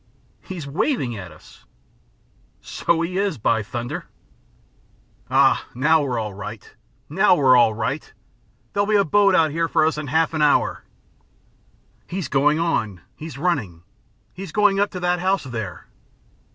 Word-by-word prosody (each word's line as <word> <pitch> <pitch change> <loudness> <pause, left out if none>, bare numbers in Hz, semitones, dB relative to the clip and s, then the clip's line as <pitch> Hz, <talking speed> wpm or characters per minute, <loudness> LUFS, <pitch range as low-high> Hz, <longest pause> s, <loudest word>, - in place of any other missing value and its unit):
"He's 180 -6 -7
waving 140 - -1
at 95 -4 -8
us!" - - -18 0.9
"So 165 -1 -1
he 180 +3 -2
is! 200 -5 -1
By 110 0 +1
thunder!" 120 +3 -5 1.2
"Ah, - - +3
now 155 +5 +3
we're 130 -4 -2
all 110 -2 -3
right! 105 +2 -9 0.3
Now 190 +5 +3
we're 130 -6 +5
all 110 -3 +4
right! 125 +7 -3 0.6
There'll 200 0 +1
be 215 - +2
a 200 -1 +4
boat 200 +3 +4
out 160 -2 +3
here 165 +2 0
for 155 - +2
us 155 -1 0
in 150 - -5
half 160 +4 +1
an 155 - -1
hour." 150 -1 +2 1.2
"He's 180 -6 -4
going 145 +2 +3
on. 110 - -1
He's 160 -2 -9
running. 125 - -2 0.5
He's 190 -2 -8
going 205 0 +3
up 205 0 +2
to 180 - -7
that 180 0 +1
house 190 +2 0
there." 110 - -6
155 Hz, 150 wpm, -22 LUFS, 120-180 Hz, 1.2 s, we're